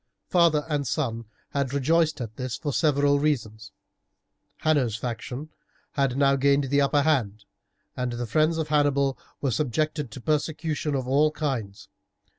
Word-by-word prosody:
Father 165 Hz, -4 st, +3 dB
and 145 Hz, -3 st, -1 dB
son 115 Hz, -5 st, -2 dB, 0.3 s
had 140 Hz, -1 st, -1 dB
rejoiced 155 Hz, +3 st, +2 dB
at 110 Hz, -2 st, -6 dB
this 130 Hz, -1 st, -4 dB
for 145 Hz, -3 st, -3 dB
several 145 Hz, -2 st, +3 dB
reasons. 110 Hz, -8 st, -2 dB, 0.9 s
Hanno's 140 Hz, -8 st, +2 dB
faction 125 Hz, +5 st, -5 dB, 0.4 s
had 135 Hz, -2 st, 0 dB
now 140 Hz, -1 st, +4 dB
gained 140 Hz, +1 st, +3 dB
the 145 Hz, 0 st, +4 dB
upper 140 Hz, +1 st, +3 dB
hand, 110 Hz, -9 st, 0 dB, 0.5 s
and 125 Hz, -1 st, -2 dB
the 120 Hz, 0 st, -3 dB
friends 155 Hz, +8 st, +2 dB
of 160 Hz, -2 st, -2 dB
Hannibal 140 Hz, -2 st, +2 dB, 0.3 s
were 135 Hz, -, 0 dB
subjected 150 Hz, +3 st, -1 dB
to 110 Hz, -, -9 dB
persecution 150 Hz, +1 st, -1 dB
of 130 Hz, -2 st, -2 dB
all 145 Hz, +4 st, +4 dB
kinds. 130 Hz, -10 st, -4 dB
140 Hz, 145 wpm, -26 LUFS, 125-155 Hz, 0.9 s, now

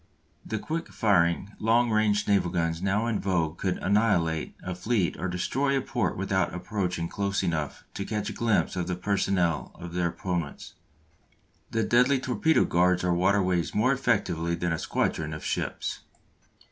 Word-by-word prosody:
The 110 Hz, -, -3 dB
quick 165 Hz, +9 st, -3 dB
firing 95 Hz, -2 st, +2 dB
long 115 Hz, +2 st, +3 dB
range 105 Hz, -1 st, +2 dB
naval 100 Hz, -3 st, +3 dB
guns 85 Hz, -1 st, -1 dB
now 100 Hz, +3 st, +1 dB
in 115 Hz, -3 st, 0 dB
vogue 85 Hz, -4 st, -1 dB
could 95 Hz, -2 st, 0 dB
annihilate 95 Hz, -6 st, +1 dB
a 90 Hz, -, -3 dB
fleet 90 Hz, +1 st, 0 dB
or -, -, -1 dB
destroy 135 Hz, +10 st, 0 dB
a -, -, 0 dB
port 120 Hz, -9 st, -1 dB
without 95 Hz, -1 st, 0 dB
approaching 90 Hz, -2 st, -2 dB
close 100 Hz, +2 st, -1 dB
enough 80 Hz, -4 st, -2 dB
to 100 Hz, -, -4 dB
catch 105 Hz, 0 st, -3 dB
a -, -, -3 dB
glimpse 115 Hz, -5 st, +1 dB
of 90 Hz, -1 st, -2 dB
the 90 Hz, -, -1 dB
personnel 90 Hz, -3 st, 0 dB
of 85 Hz, -1 st, -9 dB
their 90 Hz, -1 st, +1 dB
opponents. 85 Hz, -3 st, -4 dB, 1.0 s
The 115 Hz, -1 st, 0 dB
deadly 125 Hz, +5 st, +4 dB
torpedo 130 Hz, +5 st, +2 dB
guards 90 Hz, +1 st, +2 dB
our 90 Hz, -1 st, +2 dB
waterways 90 Hz, -1 st, +1 dB
more 125 Hz, +6 st, +3 dB
effectually 95 Hz, -10 st, 0 dB
than 85 Hz, 0 st, -1 dB
a 80 Hz, -, -2 dB
squadron 75 Hz, -1 st, -1 dB
of 75 Hz, -, -8 dB
ships. -, -, -2 dB
95 Hz, 160 wpm, -27 LUFS, 85-110 Hz, 1.0 s, deadly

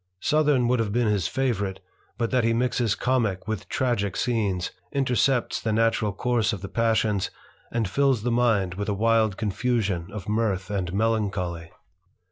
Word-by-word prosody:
Southern 150 Hz, -4 st, +2 dB
would 125 Hz, 0 st, +2 dB
have 110 Hz, -3 st, 0 dB
been 120 Hz, +2 st, +1 dB
his 100 Hz, -5 st, +1 dB
favourite, 100 Hz, -6 st, -1 dB, 0.4 s
but 115 Hz, -1 st, -1 dB
that 125 Hz, -2 st, +2 dB
he 115 Hz, 0 st, +2 dB
mixes 120 Hz, -2 st, +1 dB
comick 115 Hz, -7 st, 0 dB
with 100 Hz, -4 st, -4 dB
tragick 120 Hz, -7 st, 0 dB
scenes, 105 Hz, -7 st, 0 dB, 0.2 s
intercepts 130 Hz, -1 st, +1 dB
the 110 Hz, -, -1 dB
natural 110 Hz, -1 st, +2 dB
course 115 Hz, +1 st, 0 dB
of 100 Hz, -, -5 dB
the -, -, -4 dB
passions, 110 Hz, -3 st, +1 dB, 0.4 s
and 115 Hz, -3 st, 0 dB
fills 135 Hz, +1 st, +1 dB
the 120 Hz, -, 0 dB
mind 115 Hz, -7 st, +2 dB
with 100 Hz, +3 st, -4 dB
a 100 Hz, -, 0 dB
wild 110 Hz, -1 st, +2 dB
confusion 105 Hz, -4 st, -1 dB
ol 105 Hz, -2 st, -6 dB
mirth 105 Hz, -3 st, -1 dB
and 95 Hz, -4 st, -2 dB
melancholy. 100 Hz, -5 st, -1 dB
110 Hz, 160 wpm, -25 LUFS, 100-120 Hz, 0.4 s, Southern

